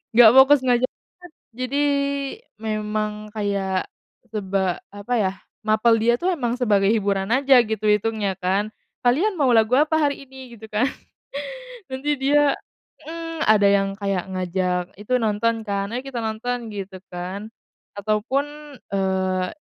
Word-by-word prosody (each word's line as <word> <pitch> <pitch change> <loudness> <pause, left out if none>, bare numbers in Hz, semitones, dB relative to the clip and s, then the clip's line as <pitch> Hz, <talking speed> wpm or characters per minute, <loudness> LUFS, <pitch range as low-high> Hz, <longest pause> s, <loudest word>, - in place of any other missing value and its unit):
enggak 230 -2 +9
fokus 275 +2 +8
ngajar 245 0 +3 0.5
banget, 235 - -46
jadi 275 +3 0 0.8
memang 215 -1 -3
kayak 200 -3 -1 0.4
seba 190 -4 -1 0.2
apa 205 +5 -3
ya, 190 -3 +1 0.3
mapel 220 +2 +4
dia 235 +2 +3
tuh 365 +2 +1
emang 240 -7 -1
sebagai 205 -5 +3
hiburan 200 -2 0
aja, 270 0 +5
gitu, 215 -1 -2
hitungnya 210 -1 +1
kan. 190 +3 0 0.4
"Kalian 350 - +3
mau 270 -4 +3
lagu 225 +2 +4
apa 310 +2 +3
hari 285 -1 0
ini?", 260 -2 -11
gitu 220 0 -11
kan, 215 +4 +1 1.0
nanti 270 +3 -1
dia 285 +1 +3 0.5
mhm, 330 0 -4
ada 210 -2 +5
yang 200 0 +3
kayak 195 -3 -1
ngajak 180 0 -1 0.2
itu 210 +5 -2
nonton 225 +1 +1
kan, 200 -1 -2
"Ayo, 245 - -2
kita 255 -3 -4
nonton", 230 +1 -3
gitu 190 -1 -6
kan, 185 +4 -5 0.5
ataupun, 275 +8 -2 0.2
eee, 190 -1 0
215 Hz, 140 wpm, -23 LUFS, 200-255 Hz, 1.0 s, enggak